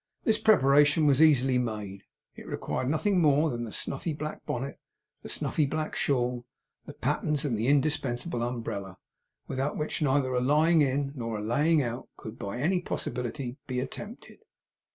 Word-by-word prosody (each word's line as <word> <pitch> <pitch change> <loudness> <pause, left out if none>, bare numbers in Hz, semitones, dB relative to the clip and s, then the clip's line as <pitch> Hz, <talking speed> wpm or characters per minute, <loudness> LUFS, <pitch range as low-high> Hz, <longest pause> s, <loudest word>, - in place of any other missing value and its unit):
This 220 -1 +2
preparation 150 -6 +5
was 140 0 +4
easily 135 -5 +5
made, 105 -5 -4 0.3
as - - -10
it - - -12
required 130 - -3
nothing 180 +5 +2
more 150 0 +4
than 120 0 -3
the 110 - -8
snuffy 145 +9 -3
black 155 +1 -6
bonnet, 135 +3 -4 0.4
the - - -9
snuffy 150 -3 0
black 155 +2 -3
shawl, 125 -2 0 0.4
the - - -7
pattens 150 -1 0
and 130 -5 0
the 110 +3 -1
indispensable 140 -2 +1
umbrella, 115 -6 -4 0.5
without 135 +3 -2
which 150 +2 -3
neither 135 -2 +2
a 125 - +1
lying 155 +5 +4
in 140 0 +1
nor 115 -4 -3
a 105 - -5
laying 145 +7 +2
out 120 +1 -5
could 110 +1 -9
by 100 +3 -4
any 175 +7 +1
possibility 125 -4 -4
be 125 -1 -2
attempted. 205 - -8
135 Hz, 165 wpm, -28 LUFS, 120-150 Hz, 0.5 s, preparation